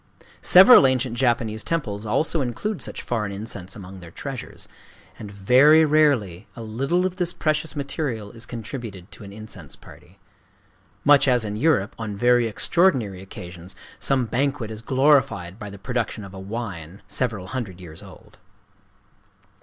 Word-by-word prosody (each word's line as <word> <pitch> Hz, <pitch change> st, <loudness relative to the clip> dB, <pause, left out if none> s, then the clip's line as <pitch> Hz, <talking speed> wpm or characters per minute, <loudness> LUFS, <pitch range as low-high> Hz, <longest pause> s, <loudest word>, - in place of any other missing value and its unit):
Several 190 Hz, -, +8 dB
ancient 130 Hz, -2 st, 0 dB
Japanese 115 Hz, -3 st, 0 dB
temples 110 Hz, -11 st, -3 dB
also 155 Hz, +8 st, +1 dB
include 150 Hz, -, -3 dB
such -, -, -3 dB
foreign 105 Hz, -4 st, -2 dB
incense 100 Hz, -2 st, -5 dB
among 95 Hz, -2 st, -10 dB
their 85 Hz, -2 st, -11 dB
treasures. 135 Hz, +8 st, -8 dB, 0.5 s
And 105 Hz, -, -8 dB
very 130 Hz, +11 st, +5 dB
rarely 135 Hz, -, +2 dB
a 115 Hz, -, -8 dB
little 135 Hz, +12 st, -1 dB
of 185 Hz, -1 st, -3 dB
this 175 Hz, -2 st, -1 dB
priceless 155 Hz, +1 st, -1 dB
material 135 Hz, -7 st, -4 dB
is 115 Hz, +1 st, -9 dB
contributed 115 Hz, -5 st, -8 dB
to -, -, -12 dB
an 100 Hz, -, -10 dB
incense 100 Hz, -8 st, -9 dB
party,—much 105 Hz, -, -3 dB
as 125 Hz, -3 st, +2 dB
in 105 Hz, 0 st, -4 dB
Europe, 130 Hz, -5 st, +1 dB
on 110 Hz, -2 st, -4 dB
very 120 Hz, +2 st, +3 dB
extraordinary 115 Hz, -, +1 dB
occasions, 90 Hz, -1 st, -10 dB, 0.2 s
some 135 Hz, -3 st, +1 dB
banquet 130 Hz, -1 st, -2 dB
is 110 Hz, 0 st, -7 dB
glorified 130 Hz, -9 st, +2 dB
by 105 Hz, -3 st, -7 dB
the 100 Hz, -, -10 dB
production 115 Hz, +1 st, -3 dB
of 95 Hz, -1 st, -11 dB
a 95 Hz, -, -8 dB
wine 95 Hz, -4 st, -7 dB
several 110 Hz, -7 st, -2 dB
hundred 115 Hz, -9 st, -5 dB
years 80 Hz, -3 st, -11 dB
old. -, -, -16 dB
115 Hz, 145 wpm, -23 LUFS, 100-135 Hz, 0.5 s, Several